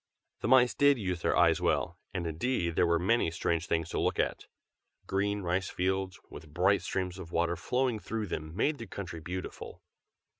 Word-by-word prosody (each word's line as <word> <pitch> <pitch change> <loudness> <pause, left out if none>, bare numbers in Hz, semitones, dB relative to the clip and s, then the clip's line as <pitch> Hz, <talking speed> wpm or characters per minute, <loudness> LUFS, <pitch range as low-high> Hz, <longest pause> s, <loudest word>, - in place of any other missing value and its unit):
The - - -2
mice 125 -1 +6
did 145 -1 +4
use 90 -5 -2
their - - +1
eyes - - +4
well; - - 0
and 90 -2 -3
indeed 85 +1 -1
there 85 - +3
were 85 0 +3
many 95 +3 +2
strange 85 0 -1
things 80 -1 0
to - - -2
look - - +1
at. - - -1 0.6
Green 100 +1 0
rice 90 +1 -1
fields, 95 0 -1
with 80 - -11
bright 95 +5 +3
streams 95 -1 -3
of 85 -3 -8
water 85 0 +1
flowing 125 +5 0
through 110 +1 -3
them, 80 -3 -5
made 145 +8 +1
the 115 - -7
country 90 -4 -6
beautiful. 90 +3 -7
95 Hz, 185 wpm, -30 LUFS, 85-105 Hz, 0.6 s, mice